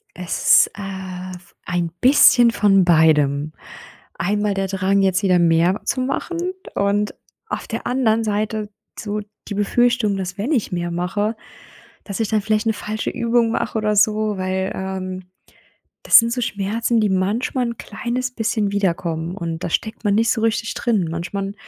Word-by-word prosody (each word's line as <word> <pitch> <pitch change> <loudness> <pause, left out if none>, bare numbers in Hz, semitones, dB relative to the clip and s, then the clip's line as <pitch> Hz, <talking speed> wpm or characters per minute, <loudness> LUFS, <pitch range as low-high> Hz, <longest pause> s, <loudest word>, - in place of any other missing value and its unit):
Es, 180 -2 +3
äh, 190 -2 -7 0.3
ein 175 -1 -1
bisschen 245 -3 +6
von 195 -4 +3
beidem. 155 -3 +3 0.6
Einmal 205 +3 0
der 195 0 -1
Drang, 195 +1 +1
jetzt 190 0 +2
wieder 180 -2 +3
mehr 170 +3 +3
zu 255 - -1
machen 275 +6 -3 0.4
und 205 +1 0 0.3
auf - - -5
der - - -5
anderen 230 -3 +1
Seite 215 0 -2 0.3
so 210 0 -3 0.3
die 205 - -4
Befürchtung, 220 0 +1
dass 190 +1 -5
wenn 225 +9 -2
ich 250 -9 0
mehr 175 -1 -2
mache, 195 +6 -1 0.7
dass 200 0 -6
ich 220 -3 -1
dann 215 -1 +1
vielleicht 215 +1 0
'ne 220 - +2
falsche 215 +1 -4
Übung 235 -1 +1
mache 225 - -2
oder 215 -1 0
so, 215 0 +2
weil, 190 0 -2
ähm. 185 -1 -5 0.8
Das - - +7
sind 230 0 0
so 250 - -2
Schmerzen, 230 +1 -1
die 210 - +2
manchmal 210 +7 0
'n 235 - -5
kleines 245 +4 -4
bisschen 220 -3 -1
wiederkommen. 170 -3 -1
Und 165 -2 -4
da - - -2
steckt 220 +7 -3
man 205 -2 +2
nicht 225 +2 +2
so 225 - -1
richtig 225 0 0
drin. 215 -8 0
Manchmal 195 +4 -4
205 Hz, 160 wpm, -20 LUFS, 185-225 Hz, 0.8 s, Das